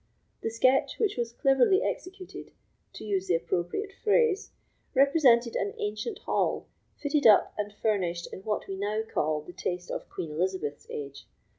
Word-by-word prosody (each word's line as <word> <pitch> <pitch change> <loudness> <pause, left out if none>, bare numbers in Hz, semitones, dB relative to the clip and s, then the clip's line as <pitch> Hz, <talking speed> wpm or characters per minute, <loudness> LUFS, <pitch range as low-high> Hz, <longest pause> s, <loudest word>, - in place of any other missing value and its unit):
The - - -1
sketch, 255 +4 +2
which 425 -3 +1
was 235 -1 -2
cleverly 270 - +3
executed, 370 0 -6 0.4
to - - -9
use 195 -2 -1
the 175 - +3
appropriate 175 - -2
phrase, 430 -2 +3 0.5
represented 260 -4 +5
an 200 0 -1
ancient 215 - -3
hall, - - -1 0.3
fitted 290 -3 +2
up 210 - +6
and 205 0 -3
furnished 185 -5 -1
in - - -6
what 210 +2 -2
we 195 - -4
now 210 +2 -1
call 155 -8 -1
the 180 - -11
taste 180 0 -4
of - - -5
Queen 160 - -5
Elizabeth's 165 -3 -2
age. 140 -1 -7
215 Hz, 155 wpm, -28 LUFS, 180-275 Hz, 0.5 s, up